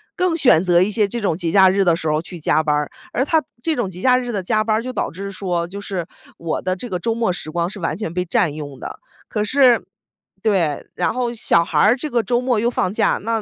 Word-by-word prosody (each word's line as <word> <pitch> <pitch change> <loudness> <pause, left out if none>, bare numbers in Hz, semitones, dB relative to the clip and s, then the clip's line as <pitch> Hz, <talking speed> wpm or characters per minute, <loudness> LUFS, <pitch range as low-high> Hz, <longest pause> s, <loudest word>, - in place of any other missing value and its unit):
更 365 -2 +1
选 245 - +5
择 175 -1 +4
一 190 - +2
些 210 -1 +2
这 235 +4 -4
种 195 -6 0
节 170 -1 -2
假 190 0 +6
日 195 +1 +2
的 170 -2 +4
时 160 - -4
候 155 +1 +1
去 175 +1 -10
加 155 0 +2
班 150 -1 +1
儿， 150 0 -1 0.2
而 255 - +1
他 315 +3 +2 0.2
这 325 -1 0
种 235 -7 -1
节 180 0 -9
假 250 +2 +4
日 245 -1 -3
的 200 - -2
加 215 +3 +1
班 215 0 +1
儿 225 - -3
就 255 - -4
导 - - -2
致 195 +3 -6
说， 175 -3 -2
就 200 +3 -8
是 190 -4 -4 0.3
我 165 -1 -3
的 185 0 -1
这 240 +6 -8
个 180 - -2
周 230 +6 -1
末 225 -4 0
时 155 -3 -5
光 170 +1 -1
是 205 - -9
完 165 -2 -2
全 185 -6 -5
被 180 +1 -1
占 165 -3 +1
用 145 -3 -8
的。 - - -8 0.3
可 210 - -2
是， 250 +2 +4 0.6
对， 180 -9 0
然 - - -1
后 245 -2 -2
小 170 -7 +3
孩 170 +8 +4
这 300 +3 -5
个 240 -2 +1
周 240 +1 +1
末 250 -2 0
又 235 - +1
放 195 -5 -1
假， - - +1
那 225 0 -1
195 Hz, 285 characters per minute, -20 LUFS, 170-235 Hz, 0.6 s, 假